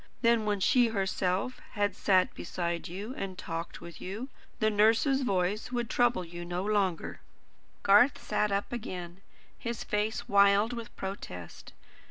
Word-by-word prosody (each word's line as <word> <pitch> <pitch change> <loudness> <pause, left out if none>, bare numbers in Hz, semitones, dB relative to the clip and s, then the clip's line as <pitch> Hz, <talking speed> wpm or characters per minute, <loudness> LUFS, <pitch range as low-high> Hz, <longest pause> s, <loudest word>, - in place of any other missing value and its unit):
Then 230 -2 +4
when 205 -1 +1
she 245 +5 +4
herself 195 +3 -1
had 205 -3 0
sat 185 -3 +3
beside 170 -1 -3
you, 200 +8 -6
and 190 -6 -5
talked 165 -1 -5
with 170 - -10
you, 215 +8 -5 0.3
the 215 -1 +3
nurse's 225 +6 +4
voice 200 -1 0
would 240 -2 -2
trouble 240 -7 +2
you 175 +1 -7
no 175 +2 -3
longer." 200 -5 0 0.6
Garth 210 +7 +6
sat 210 -1 0
up 200 +4 -1
again, 180 -5 -6 0.4
his 235 -1 -4
face 210 +1 -1
wild 200 +3 +5
with 235 0 -7
protest. 90 - -7
200 Hz, 145 wpm, -30 LUFS, 185-225 Hz, 0.6 s, Garth